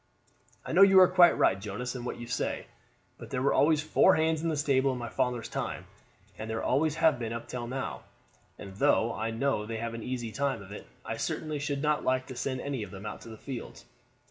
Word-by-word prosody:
"I - - -5
know 180 - +4
you 195 -1 +8
are 185 - +8
quite 180 -1 +6
right, 95 - +3
Jonas, 115 +5 -4
in 125 -1 -6
what - - -4
you 120 - -7
say. 120 - -2 0.5
But - - -10
there 125 - -2
were 140 - +3
always 150 0 +3
four 185 +4 +4
hands 160 0 +1
in 165 - -1
the 155 - -1
stable 140 -2 +2
in 130 - -3
my 120 -1 -5
father's 125 -2 -1
time, - - -4 0.5
and 110 - -5
there 110 0 -3
always 150 +3 +1
have 160 -5 +3
been 115 -2 -3
up 115 0 -6
to 120 -1 -4
now; 135 +2 -4 0.6
and 100 -2 -10
though 115 +2 +3
I 110 +1 -2
know 115 -2 -1
they 115 0 -4
have 115 +1 -4
an 115 - -6
easy 120 -1 -4
time 135 -4 -1
of 100 - -13
it, 105 - -9 0.2
I - - -4
certainly 155 -2 -3
should 140 -1 -2
not 150 0 +1
like 130 0 +1
to 130 - -9
send 130 +1 -3
any 140 -4 -3
of 105 - -6
them 95 +2 -10
out 105 - -6
to - - -11
the 110 - -9
fields. 120 - -8
130 Hz, 240 wpm, -29 LUFS, 115-150 Hz, 0.6 s, you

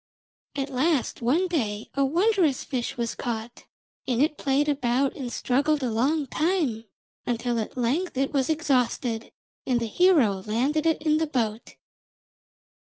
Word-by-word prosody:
At 280 0 -3
last 270 0 0
one 300 +11 +2
day 220 -11 -2
a 275 - +1
wondrous 340 - +2
fish 250 -4 -3
was 235 -1 -2
caught, 235 -1 -5 0.4
and 245 -2 0
it 300 +2 +2
played 280 +1 +1
about 270 -2 +1
and 250 -3 -5
struggled 285 +4 +1
a 245 - 0
long 280 +7 +1
time 300 - 0 0.4
until 240 0 -1
at 220 - -5
length 270 +7 -1
it 270 +2 0
was 270 -1 +1
exhausted, 255 -6 0 0.4
and 250 -2 +2
the 230 - -2
hero 245 - +3
landed 280 +9 +1
it 320 -2 +1
in 310 -1 +3
the 320 - 0
boat. 230 -6 -2
270 Hz, 150 wpm, -26 LUFS, 235-305 Hz, 0.4 s, hero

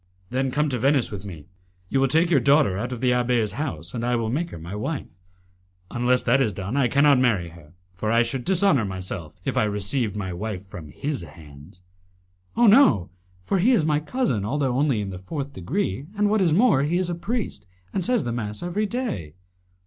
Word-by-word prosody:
"Then 130 +1 0
come 150 +4 +1
to 125 -3 -2
Venice 135 0 +2
with 100 -1 -7
me. 80 -7 -9 0.4
You 135 - 0
will 135 - +3
take 165 +6 +2
your 145 - +5
daughter 140 -5 +3
out 105 - -3
of 125 - -5
the 125 -1 +3
abbé's 120 -3 +1
house, 90 - -5
and 115 - -3
I 120 +1 +1
will 115 -1 -1
make 165 +6 -1
her - - -8
my 85 +4 -8
wife. 135 +8 -3 0.9
Unless 125 +1 +1
that 125 +3 +3
is 110 -7 0
done 100 +6 -4
I 140 -3 +3
cannot 140 +2 +4
marry 105 -9 +1
her, 80 -2 -16 0.2
for 105 +4 -2
I 115 +1 +4
should 120 +2 -3
dishonour 190 - +3
myself 95 -4 -5
if - - -1
I - - +4
received 105 +2 -1
my 95 -3 -4
wife 100 0 -5
from 85 -5 -10
his 145 - -4
hands." 80 +3 -14 0.7
"Oh, 240 - +5
no! 200 - +5 0.3
for 190 - 0
he 235 +8 +4
is 175 -10 +3
my 150 -1 +2
cousin, 160 - -1
although 130 +3 0
only 135 -5 +1
in 100 -1 -4
the 90 - -7
fourth 140 +9 -5
degree, 140 - -3
and, 205 0 +2
what 215 -1 +2
is 175 -4 +3
more, 195 - +4
he 155 +5 +1
is 180 -1 -1
a - - -1
priest 205 - -4 0.3
and 190 - -1
says 245 +2 +1
the 120 - -3
mass 105 +1 -4
every 200 +5 -1
day." 200 - -4
125 Hz, 215 wpm, -24 LUFS, 100-155 Hz, 0.9 s, your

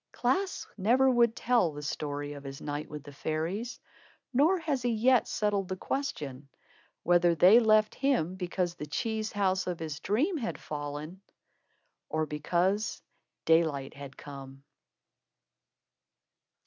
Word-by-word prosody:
Klaas 370 +11 0
never 255 +7 +4
would 235 -2 +3
tell 235 -9 +2
the 145 0 -7
story 145 0 -3
of 140 -1 -10
his 135 0 -7
night 145 +1 -4
with 150 -2 -7
the 145 - -10
fairies, 165 - -3 0.5
nor 310 +9 +4
has 305 -6 -1
he 245 - 0
yet 240 +2 +3
settled 205 -3 0
the 185 - -3
question 145 - -4 0.5
whether 175 -1 +4
they 185 +8 +7
left 215 -2 +4
him 255 - +1
because 180 -1 -2
the 150 -3 -7
cheese 220 +7 -2
house 190 -2 +1
of 180 -2 -2
his 155 -2 -5
dream 290 - +1
had 230 -5 -4
fallen, 150 +4 -6 0.9
or 155 0 0
because 180 +8 0 0.4
daylight 160 -5 +2
had 140 -1 -10
come. 135 -1 -10
180 Hz, 135 wpm, -30 LUFS, 150-230 Hz, 0.9 s, they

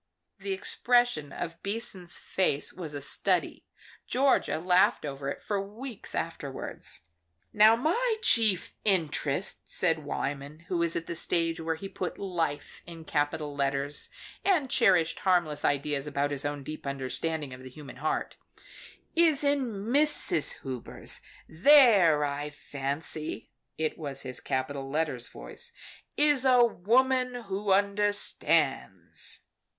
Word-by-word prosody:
The 395 - -4
expression 245 - +1
of 165 -1 -6
Beason's 200 -4 -3
face 150 -6 0
was 160 -5 -6
a 145 - -4
study. - - -1 0.4
Georgia 270 - +2
laughed 180 0 +3
over 140 -1 -4
it - - -6
for 200 -2 -1
weeks 220 +4 -8
afterwards. 145 -5 -5 0.5
"Now 215 +1 +7
my 440 - +1
chief 215 -6 +3
interest," 170 -3 0
said 165 -3 +1
Wyman, 145 +2 -4
who 180 -2 0
was 170 -1 +1
at 165 - -2
the 170 - -5
stage 165 0 0
where 160 0 -1
he 195 +5 -7
put 185 -2 -5
life 165 -7 -3
in 165 -2 -10
capital 145 -1 -1
letters, 140 +1 -1 0.3
and 325 -10 +2
cherished 180 -8 +3
harmless 175 -6 +2
ideas 145 0 0
about 145 0 -1
his 145 0 -3
own 145 -1 -3
deep 155 +1 -7
understanding 140 +2 -3
of 125 - -10
the 130 - -9
human 140 -1 -11
heart, 155 +4 -2 0.8
"is 320 -4 +4
in 285 -2 +2 0.2
Mrs. 280 - +2
Hubers. 130 -3 -5 0.3
There, 190 - +6
I 145 +1 -3
fancy," 145 +2 -4 0.3
it 155 +1 -2
was 140 -3 -3
his 130 -1 -3
capital 135 +1 -3
letter 150 -3 -1
voice - - -7 0.4
"is 290 -3 +4
a 250 -2 +6
woman 250 +4 +2
who 200 0 -2
understands." 205 +1 0
165 Hz, 130 wpm, -29 LUFS, 145-215 Hz, 0.8 s, Now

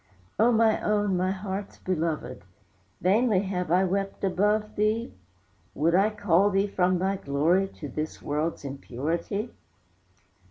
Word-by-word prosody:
O 230 +3 +5
my 225 -1 +3
own, 205 -2 +1
my 185 +1 +1
heart's 195 +1 -5
belovèd, 160 -8 -3 0.6
Vainly 205 +1 +3
have 180 -4 -3
I 180 +2 +4
wept 195 +2 -2
above 210 +3 +1
thee? 215 +3 0 0.6
Would 165 +3 +2
I 195 +4 +4
call 205 -2 +2
thee 195 0 +2
from 185 -2 +1
thy 190 +2 0
glory 165 +6 +1
To 160 -5 -9
this 155 +4 -5
world's 150 +1 -2
impurity? 155 - -3
190 Hz, 130 wpm, -27 LUFS, 170-205 Hz, 0.6 s, O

